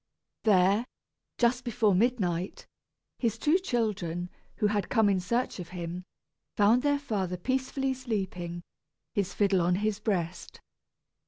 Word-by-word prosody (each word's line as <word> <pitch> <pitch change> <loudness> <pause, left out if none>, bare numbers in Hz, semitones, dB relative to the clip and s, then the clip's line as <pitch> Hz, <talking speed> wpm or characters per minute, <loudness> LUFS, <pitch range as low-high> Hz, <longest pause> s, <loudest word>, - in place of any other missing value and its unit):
There, 200 +3 +4 0.5
just 245 +1 +2
before 225 -4 +2
midnight, 185 -5 0 0.5
his 230 -3 0
two 310 +9 +3
children, 195 - -2 0.2
who - - 0
had 205 -1 +1
come 220 -3 +4
in 195 -2 +2
search 235 +5 -1
of 175 - -7
him, 175 0 -5 0.5
found 215 +4 +5
their 285 +1 +2
father 200 -10 -2
peacefully 265 +5 -1
sleeping, 190 -9 -4 0.5
his 200 -2 -1
fiddle 195 -3 +3
on 175 +1 +2
his 210 +1 -1
breast. 185 -5 -2
205 Hz, 130 wpm, -29 LUFS, 180-240 Hz, 0.5 s, found